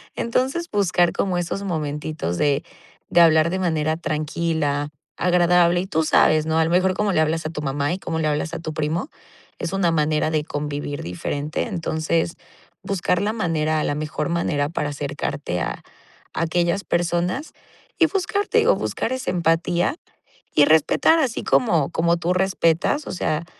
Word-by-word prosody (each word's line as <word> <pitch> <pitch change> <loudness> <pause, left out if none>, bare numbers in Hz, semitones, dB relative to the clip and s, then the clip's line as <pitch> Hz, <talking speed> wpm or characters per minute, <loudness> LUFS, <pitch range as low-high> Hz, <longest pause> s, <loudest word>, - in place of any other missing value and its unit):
Entonces, 265 +8 -1
buscar 180 -4 +2
como 185 -2 -1
esos 175 +3 -3
momentitos 150 - -3
de 145 -2 +1 0.5
de 175 - +5
hablar 160 0 +5
de 190 - -1
manera 160 -3 0
tranquila, 155 -2 -1 0.3
agradable. 175 0 +3
Y 190 - -5
tú 160 -3 0
sabes, 155 0 +4
¿no?, 160 0 +1
a - - +4
lo - - -1
mejor, 185 +1 +3
cómo 210 0 0
le 160 - +2
hablas 160 +1 0
a 155 - -1
tu 150 -2 -5
mamá, 140 +2 -1
y 185 - -2
cómo 165 -2 -3
le 155 - 0
hablas 150 +2 -1
a - - -3
tu 155 -1 -5
primo 155 - -2 0.5
es 180 - -4
una 195 -3 +2
manera 155 -1 +1
de 155 -1 0
convivir 145 -1 -4
diferente. 145 - -3
Entonces, 165 -3 -1 0.5
buscar 180 -2 0
la 210 +2 0
manera, 155 -6 0
la 145 - -1
mejor 155 +3 -3
manera 150 -4 0
para 150 -2 -2
acercarte 140 -8 -3
a - - -3 0.5
aquellas 170 +3 0
personas 175 - -1 0.5
y 330 - +6
buscar, 395 +2 -1
te 460 - +3
digo, 455 +2 +4
buscar 235 - -3
esa 260 0 -2
empatía 175 - +1 0.6
y 145 - +6
respetar 160 - +4
así 260 -7 -1
como 170 - +2
como 170 +1 +2
tú 175 +1 0
respetas. 190 - +1
O - - -4
sea, 165 -2 -1
165 Hz, 170 wpm, -22 LUFS, 155-180 Hz, 0.6 s, y